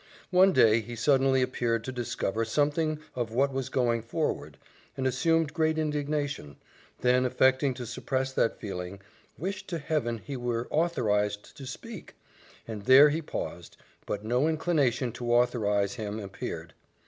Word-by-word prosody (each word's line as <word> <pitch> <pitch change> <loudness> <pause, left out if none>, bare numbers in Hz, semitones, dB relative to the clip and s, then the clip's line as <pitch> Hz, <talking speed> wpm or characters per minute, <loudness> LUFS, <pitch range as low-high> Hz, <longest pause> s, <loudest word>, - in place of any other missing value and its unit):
One 190 +1 +6
day 115 -8 +5
he 120 +2 -8
suddenly 135 +1 +3
appeared 120 -3 -1
to 130 - -4
discover 115 -3 -2
something 150 +6 +1 0.2
of 120 -3 -2
what 135 +4 +1
was 135 -2 -2
going 120 -3 +1
forward, 150 +8 -3 0.4
and 130 - -2
assumed 160 +4 +2
great 160 -1 +1
indignation; 145 - -2 0.5
then 125 +1 +4
affecting 130 +1 +2
to 125 - -6
suppress 130 +3 -2
that 115 - +1
feeling, 95 -2 -6 0.4
"wished 195 +4 -4
to 170 - -3
Heaven 145 -6 -1
he 140 +5 -7
were 120 -1 -2
authorized 105 -11 0
to 135 -3 -9
speak" 215 - -9 0.5
and 105 -3 -6
there 135 +4 +8
he 155 +3 -1
paused 85 - -6 0.3
but 105 +1 -3
no 125 +6 +2
inclination 145 -7 +1
to 120 +1 -4
authorize 105 -5 +2
him 110 -2 -4
appeared. 100 -2 -6
130 Hz, 150 wpm, -28 LUFS, 115-150 Hz, 0.5 s, there